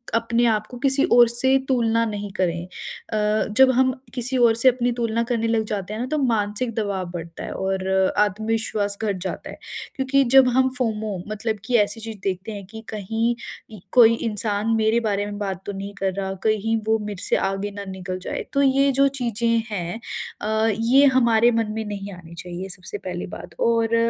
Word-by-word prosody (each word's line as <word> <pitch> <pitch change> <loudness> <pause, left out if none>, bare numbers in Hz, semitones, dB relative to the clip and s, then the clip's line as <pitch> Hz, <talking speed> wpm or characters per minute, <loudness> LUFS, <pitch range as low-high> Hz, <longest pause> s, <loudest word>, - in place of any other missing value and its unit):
अपने 230 +1 +1
आप 215 -2 +1
को 250 - -9
किसी 275 +1 +2
और 240 0 +8
से 260 +3 +5
तुलना 230 -3 +2
नहीं 205 -2 -4
करें। 175 -2 0 0.5
अ, 215 0 +1
जब 265 0 +7
हम 260 +1 +4 0.2
किसी 255 +1 -1
और 235 -2 +5
से 255 +3 +6
अपनी 245 0 0
तुलना 230 0 0
करने 230 -1 0
लग 225 -1 +1
जाते 205 0 -4
हैं 220 - -5
ना 250 - -1
तो 305 - +1
मानसिक 230 -2 0
दबाव 200 -4 -2
बढ़ता 170 -1 -7
है - - -6
और 190 0 -2 0.3
आत्मविश्वास 210 0 0
घट 200 -3 0
जाता 185 - -5
है। - - -9 0.4
क्योंकि 270 0 +2
जब 265 -1 +8
हम 260 0 +4
फोमो 220 -5 -2
मतलब 215 0 -2
कि 245 - 0
ऐसी 210 +1 +1
चीज़ 220 -1 -7
देखते 190 +2 -3
हैं 200 -2 -7
कि 220 +2 -9
कहीं 225 +3 -1 0.4
इ 205 - -11
कोई 230 -2 +7
इंसान 210 -2 -1
मेरे 220 +1 +2
बारे 205 -3 -1
में 205 0 -6
बात 195 -3 -3
तो 205 - -3
नहीं 200 +1 -6
कर 195 -1 -1
रहा, 195 0 -3
कहीं 220 +1 +1
वो 220 0 +3
मेरे 205 -3 -6
से - - +1
आगे 195 +1 -2
ना 200 0 -7
निकल 185 0 -5
जाए - - -4
तो 280 - +2
ये 275 +1 +4
जो 275 +1 +4
चीज़ें 235 -1 -1 0.2
हैं 180 +2 -3 0.4
अ, 220 +1 +1
ये 260 +5 +5
हमारे 235 -2 +4
मन 225 -2 0
में 220 -1 -3
नहीं 200 -1 -6
आनी 170 -2 -12
चाहिए 180 +2 -7
सबसे 180 +3 -7
पहली 180 -3 -5
बात। 200 - -10
और 230 0 +2
220 Hz, 200 wpm, -23 LUFS, 200-235 Hz, 0.5 s, और